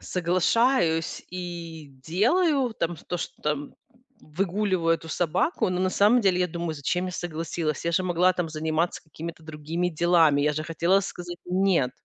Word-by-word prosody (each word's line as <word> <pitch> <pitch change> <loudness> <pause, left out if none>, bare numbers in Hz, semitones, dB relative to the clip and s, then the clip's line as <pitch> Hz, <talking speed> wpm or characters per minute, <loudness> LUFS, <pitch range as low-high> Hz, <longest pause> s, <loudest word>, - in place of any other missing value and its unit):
соглашаюсь 180 0 +1
и 170 -4 -7 0.2
делаю, 255 - +2
там, 170 0 -1
ш - - -16
то, 175 - -1
что, 170 - -7
там, 150 -1 -2 0.5
выгуливаю 180 +1 0
эту 165 0 -8
собаку, 180 - 0
но 180 0 -1
на 185 0 +1
самом 215 +6 +4
деле 185 -3 +2
я 180 - +3
думаю: 170 -1 -4
"Зачем 175 +6 -1
я 180 - -5
согласилась? 165 -2 -3
Я 170 - 0
же 185 - +2
могла, 180 0 +3
там, 175 -3 -2
заниматься 160 +2 -1
какими-то 160 +1 -8
другими 160 +3 -3
делами. 165 -3 +3
Я 150 0 +2
же 155 +1 -3
хотела 170 +4 +2
сказать 175 -2 -7
"нет"". 180 -8 +2
175 Hz, 165 wpm, -26 LUFS, 160-185 Hz, 0.5 s, самом